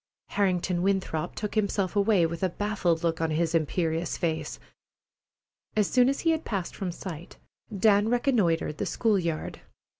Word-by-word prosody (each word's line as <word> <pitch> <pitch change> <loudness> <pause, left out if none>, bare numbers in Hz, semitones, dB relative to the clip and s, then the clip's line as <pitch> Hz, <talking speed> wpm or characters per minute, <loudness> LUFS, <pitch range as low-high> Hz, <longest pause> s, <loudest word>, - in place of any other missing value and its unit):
Harrington 180 -3 0
Winthrop 190 -5 -1
took 210 -1 -4
himself 200 -2 0
away, 200 -3 +4
with 165 0 -4
a 185 - +2
baffled 180 -4 -1
look 165 -1 0
on 165 - +1
his 160 +2 0
imperious 165 +1 0
face. 160 -2 -2 1.2
As 210 -2 +3
soon 250 0 +5
as 275 - -1
he 330 - +3
had 320 0 -1
passed 195 -5 -3
from 185 -3 -3
sight, 170 -2 -8 0.3
Dan 205 0 +3
reconnoitred 215 - +1
the - - -1
school 220 -4 +1
yard. 165 -3 -3
185 Hz, 155 wpm, -27 LUFS, 165-210 Hz, 1.2 s, soon